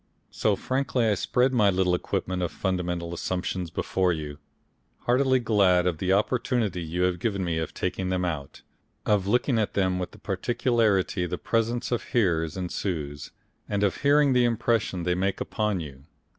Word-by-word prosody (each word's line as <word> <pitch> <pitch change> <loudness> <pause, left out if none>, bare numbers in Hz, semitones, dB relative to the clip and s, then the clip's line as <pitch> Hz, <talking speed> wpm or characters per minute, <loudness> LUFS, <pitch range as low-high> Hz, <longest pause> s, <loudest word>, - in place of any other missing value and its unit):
So 105 -2 +1
frankly 130 +1 0
I 105 - +3
spread 125 +6 +1
my 105 -5 +4
little 90 -1 +2
equipment 90 +1 -2
of 90 - -1
fundamental 90 -3 -2
assumptions 90 0 -3
before 90 +2 0
you, 75 -3 -5 0.6
heartily 130 +2 +3
glad 100 -6 +3
of 85 -3 0
the 95 0 0
opportunity 105 -2 +1
you 85 +2 -2
have 90 -1 +1
given 100 -3 -1
me 85 -2 -1
of 80 - -3
taking 95 -1 -3
them 90 -1 0
out, 75 -6 -5 0.4
of 100 -2 +2
looking 120 +2 +2
at 105 - -1
them 95 -2 +1
with 90 0 -3
the 110 - -16
particularity 105 -3 0
the 90 +1 -3
presence 115 +4 -1
of 120 - +1
hearers 85 - 0
ensures, 80 -5 -4 0.4
and 100 -1 0
of 100 - +1
hearing 145 -1 +4
the 125 -1 +4
impression 115 -5 0
they 90 +1 +1
make 95 +2 -1
upon 105 -3 -1
you. 70 -4 -9
95 Hz, 170 wpm, -26 LUFS, 90-115 Hz, 0.6 s, my